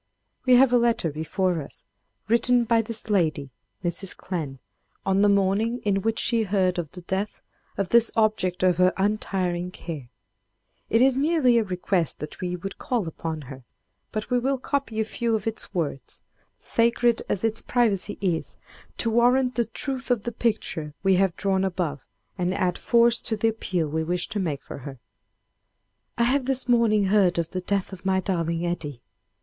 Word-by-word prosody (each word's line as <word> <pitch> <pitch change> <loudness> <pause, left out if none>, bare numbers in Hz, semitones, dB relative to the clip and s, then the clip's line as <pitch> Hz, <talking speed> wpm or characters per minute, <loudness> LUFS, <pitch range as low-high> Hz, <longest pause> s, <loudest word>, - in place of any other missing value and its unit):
We 250 - +7
have 250 0 +5
a 245 - +6
letter 230 -9 +1
before 170 +3 -1
us, 140 - -12 0.4
written 235 +2 +4
by 230 0 +3
this 225 0 -4
lady, 155 -8 +1 0.3
Mrs. 180 +2 -3
Clemm, 155 -8 -4 0.5
on 195 0 +2
the 205 - +5
morning 200 +4 +2
in 195 -1 +1
which 225 +2 -1
she 230 0 +1
heard 190 -3 +1
of 160 -4 -5
the 180 -1 -9
death 190 +4 -3 0.3
of 195 -3 -1
this 235 -1 +6
object 215 -5 +1
of 180 -2 +3
her 185 0 +4
untiring 190 -3 -1
care. 155 -8 -8 0.8
It 225 +3 +4
is 265 -1 +4
merely 275 -4 +3
a - - +1
request 180 -3 -1
that 150 - -8
we 180 -1 -2
would 195 +2 -7
call 235 -8 -1
upon 160 -1 -5
her, 130 -1 -10 0.5
but 215 +1 -4
we 250 - +3
will 270 +2 0
copy 260 -4 -2
a 220 - +1
few 230 +1 -1
of 210 - -3
its 225 0 -4
words—sacred 230 - -1
as 195 - -1
its 225 0 +1
privacy 205 -5 0
is—to 185 +5 -3
warrant 250 +2 +3
the 235 -1 +1
truth 260 +4 -3
of 240 -4 +1
the 240 - -3
picture 185 -10 -2
we 195 -1 +4
have 190 -2 +2
drawn 195 -1 +1
above, 175 -7 -2 0.4
and 180 +1 0
add 180 -1 0
force 235 0 +4
to 220 - -2
the 225 +2 +2
appeal 185 -7 -2
we 160 +2 -1
wish 175 +2 -1
to 210 - -2
make 155 -7 -2
for - - -8
her: 135 0 -8 1.2
"I 235 - +3
have 260 +2 +2
this 265 -1 0
morning 230 -4 +3
heard 190 -3 +3
of 170 -1 -1
the 185 - -3
death 195 +1 -1
of 185 - -10
my 190 -1 +2
darling 170 -3 -1
Eddie.... 150 -8 -4
195 Hz, 175 wpm, -25 LUFS, 175-230 Hz, 1.2 s, We